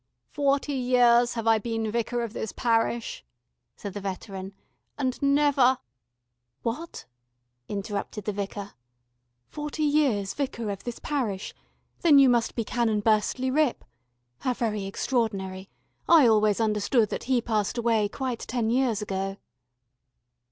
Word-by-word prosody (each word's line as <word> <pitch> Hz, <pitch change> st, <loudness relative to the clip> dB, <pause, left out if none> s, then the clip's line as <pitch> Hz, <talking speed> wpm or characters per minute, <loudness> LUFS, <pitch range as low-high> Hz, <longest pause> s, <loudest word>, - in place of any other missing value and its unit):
"Forty 285 Hz, 0 st, +1 dB
years 245 Hz, -2 st, +4 dB
have 230 Hz, -1 st, -3 dB
I 225 Hz, -1 st, +4 dB
been 225 Hz, -1 st, -2 dB
Vicar 235 Hz, +1 st, -1 dB
of 225 Hz, -2 st, -5 dB
this 220 Hz, -, -4 dB
parish," 230 Hz, -, 0 dB, 0.5 s
said 200 Hz, -, -7 dB
the 205 Hz, -, -5 dB
veteran, 195 Hz, 0 st, -6 dB, 0.4 s
"and 260 Hz, -3 st, -2 dB
never 280 Hz, -2 st, +4 dB, 0.4 s
" 120 Hz, +1 st, -54 dB
"What?" 305 Hz, +9 st, -4 dB, 0.6 s
interrupted 205 Hz, 0 st, -4 dB
the 210 Hz, -, 0 dB
Vicar, 200 Hz, 0 st, -5 dB, 0.7 s
"Forty 300 Hz, +1 st, -4 dB
years 280 Hz, -10 st, +2 dB
Vicar 235 Hz, -6 st, -3 dB
of 200 Hz, -, -7 dB
this 240 Hz, -1 st, -4 dB
parish. 235 Hz, -10 st, -3 dB, 0.5 s
Then 310 Hz, -4 st, +6 dB
you 275 Hz, -2 st, +7 dB
must 240 Hz, -2 st, +1 dB
be 230 Hz, -, -1 dB
Canon 220 Hz, -2 st, 0 dB
Burstley 220 Hz, +4 st, +1 dB
Ripp. 300 Hz, -2 st, +1 dB, 0.5 s
How 255 Hz, -1 st, -1 dB
very 215 Hz, -4 st, -2 dB
extraordinary, 195 Hz, -4 st, -2 dB, 0.4 s
I 325 Hz, -5 st, +8 dB
always 215 Hz, -2 st, +4 dB
understood 215 Hz, +1 st, +2 dB
that -, -, -4 dB
he 255 Hz, 0 st, +2 dB
passed 220 Hz, -2 st, -1 dB
away 225 Hz, -3 st, +2 dB
quite 255 Hz, 0 st, -3 dB
ten 230 Hz, -2 st, -2 dB
years 240 Hz, -4 st, +1 dB
ago." 195 Hz, -1 st, -3 dB
230 Hz, 135 wpm, -26 LUFS, 205-255 Hz, 0.7 s, I